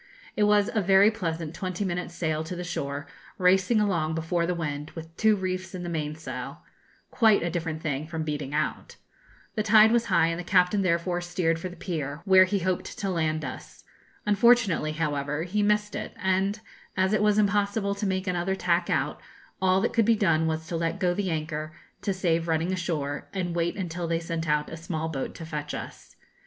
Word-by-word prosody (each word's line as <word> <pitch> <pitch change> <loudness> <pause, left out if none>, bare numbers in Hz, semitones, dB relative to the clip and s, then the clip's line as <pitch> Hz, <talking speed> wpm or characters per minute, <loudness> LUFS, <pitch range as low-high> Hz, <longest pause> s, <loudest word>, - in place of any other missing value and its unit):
It 210 - +3
was 205 -1 +4
a 220 - +2
very 195 +2 +5
pleasant 165 -7 -3
twenty 185 +2 -3
minutes' 175 -1 -3
sail 155 -2 -1
to 180 - -5
the 180 - -5
shore, 140 -3 -4 0.3
racing 190 +4 +4
along 170 -7 +1
before 170 +1 0
the 180 - 0
wind, 150 -2 -4
with 165 0 -9
two 220 +2 +4
reefs 185 -1 -3
in 180 - -5
the 175 - -4
mainsail 150 -5 -5 0.5
quite 220 -6 +4
a 170 - -1
different 160 -2 -3
thing 145 0 -2
from 160 0 -3
beating 150 -3 -3
out. 150 +1 -2 0.6
The 215 - 0
tide 215 0 +6
was 235 0 +3
high, 165 - +3
and 165 +1 -2
the - - -4
captain 180 +2 +3
therefore 175 0 0
steered 175 -2 0
for 185 - -4
the 180 - -11
pier, 155 -4 -4
where 190 -1 +7
he 200 +2 0
hoped 185 -1 -2
to 195 -2 -2
land 155 -3 0
us. 130 - -9 0.4
Unfortunately, 210 -7 +3
however, 150 -1 -1
he 195 +4 -1
missed 210 0 +1
it; 215 - -5
and 190 +3 0 0.4
as 190 +2 +2
it 215 - +2
was 210 0 +3
impossible 205 0 +1
to 200 +1 -2
make 190 0 -1
another 180 0 0
tack 175 -1 +1
out, - - 0 0.4
all 190 0 +3
that 235 - 0
could 225 -2 +3
be 230 +1 +4
done 165 -6 +2
was 160 0 -2
to 165 - -4
let 165 +3 -1
go 180 -3 +2
the 195 0 -2
anchor 155 -1 -3 0.3
to 205 - -1
save 170 -3 0
running 165 +3 0
ashore, 155 -6 -3
and 175 -2 -2
wait 170 0 0
until 175 -2 -3
they 165 0 0
sent 165 -1 -3
out 150 0 +1
a 165 - -7
small 160 -1 -3
boat 135 -4 -4
to 165 - -7
fetch 150 -2 -4
us. - - -9
175 Hz, 200 wpm, -27 LUFS, 160-195 Hz, 0.6 s, where